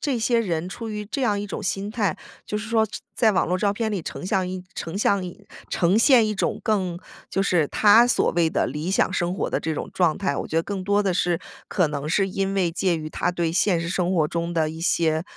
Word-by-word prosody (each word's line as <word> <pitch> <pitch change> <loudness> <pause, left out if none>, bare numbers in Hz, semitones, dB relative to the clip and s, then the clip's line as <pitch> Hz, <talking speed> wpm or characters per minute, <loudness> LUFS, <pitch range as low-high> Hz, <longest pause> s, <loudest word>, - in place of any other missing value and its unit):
这 275 -5 -1
些 230 +1 +2
人 175 -5 -2
出 225 +4 -6
于 210 -1 -4
这 265 +7 -4
样 210 -5 +1
一 205 - -4
种 200 - -5
心 195 +2 -2
态， 210 -8 0 0.3
就 210 - -3
是 215 +1 -6
说 225 -1 +3
这 210 - -7 0.2
在 225 - +4
网 185 - +2
络 180 +2 0
照 200 +1 +1
片 220 +1 -2
里 190 - -2
成 180 - -6
像 190 -2 +1
一 185 0 -5
成 165 +4 -5
像 200 -2 +2
一 180 +3 -10 0.2
呈 180 +2 +2
现 235 -2 +6
一 215 - -1
种 210 +2 -1
更 185 -5 0 0.3
就 195 - 0
是 170 -6 +2
他 215 +3 +6
所 245 - +2
谓 170 -2 +2
的 - - +1
理 155 +4 -3
想 195 - +2
生 175 0 0
活 - - -2
的 - - -1
这 160 - -2
种 150 - -4
状 170 -4 +2
态。 185 -8 -1
我 - - -4
觉 160 - -3
得 165 - +3
更 200 -2 -4
多 200 +2 +2
的 195 -3 0
是 175 -1 +1 0.3
可 180 -4 +2
能 145 0 -4
是 195 +4 +2
因 195 +1 -2
为 180 -4 +1
介 180 0 +1
于 155 -1 -5
他 175 - -1
对 170 -2 -1
现 180 -1 +2
实 170 - -3
生 180 +1 0
活 160 -4 +2
中 170 +2 -3
的 160 -2 +1
一 160 +1 -7
些， 160 -2 +1
185 Hz, 275 characters per minute, -24 LUFS, 170-205 Hz, 0.3 s, 现